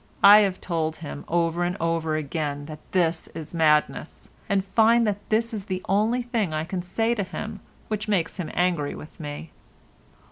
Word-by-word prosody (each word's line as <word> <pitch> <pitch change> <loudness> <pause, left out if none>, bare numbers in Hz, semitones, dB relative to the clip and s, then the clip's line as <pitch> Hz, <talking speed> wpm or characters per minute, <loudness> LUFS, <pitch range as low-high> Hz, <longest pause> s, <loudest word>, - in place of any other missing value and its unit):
I 205 +1 +10
have 195 -3 +1
told 160 -3 -2
him 150 -2 -7
over 170 0 +1
and 180 +2 -1
over 165 -1 0
again 145 -1 -3
that 155 0 -8
this 170 -3 +1
is 160 0 -6
madness, 155 -2 +1 0.2
and 195 -1 +1
find 230 +3 +4
that 205 -1 0
this 225 +2 +1
is 205 -3 -4
the 185 -2 -3
only 220 +5 +2
thing 225 -9 -1
I 155 - -1
can 180 +2 -3
say 225 +6 0
to 225 - -1
him 205 +3 -6 0.3
which 215 -1 -3
makes 185 -5 0
him 180 -5 -4
angry 175 -5 +1
with 155 - -11
me. 150 +1 -7
180 Hz, 180 wpm, -25 LUFS, 160-210 Hz, 0.3 s, I